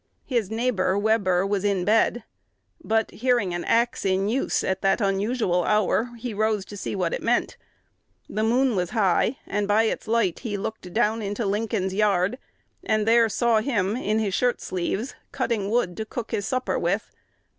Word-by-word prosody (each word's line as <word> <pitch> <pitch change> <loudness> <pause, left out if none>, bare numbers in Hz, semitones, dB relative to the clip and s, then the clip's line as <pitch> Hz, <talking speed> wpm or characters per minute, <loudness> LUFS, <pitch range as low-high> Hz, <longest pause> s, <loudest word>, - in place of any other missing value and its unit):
His 235 -7 -1
neighbor, 220 -4 0
Webber, 200 -4 +2
was 200 -1 -1
in 195 -3 0
bed; 225 +2 +2 0.6
but, 220 -3 0
hearing 240 -6 +1
an 175 - -3
axe 235 +2 +1
in 195 0 +1
use 260 +4 0
at 190 - -1
that 195 +3 +2
unusual 195 -2 +1
hour, 215 +4 +1
he 235 0 -5
rose 215 -1 0
to 205 - -10
see 205 - -4
what 180 -3 -1
it - - -3
meant. 240 +1 0 0.7
The 215 - -3
moon 245 +2 +2
was 180 -2 -1
high; 210 +5 +2
and 205 0 -2
by 210 +2 +4
its 225 - -2
light 225 -5 +1
he 215 -5 -4
looked 195 -2 -6
down 225 +2 +1
into 205 +2 -3
Lincoln's 200 -2 -1
yard, 200 +2 +1 0.4
and 215 -1 0
there 230 0 +5
saw 230 +1 +2
him 215 -5 0
in 215 -3 -1
his 210 -3 -1
shirt 245 +4 +1
sleeves 190 +7 -3 0.2
"cutting 230 -6 -1
wood 215 -6 0
to 220 - -3
cook 230 +1 -6
his 205 -4 -2
supper 255 0 -1
with." - - -1
215 Hz, 175 wpm, -24 LUFS, 195-230 Hz, 0.7 s, there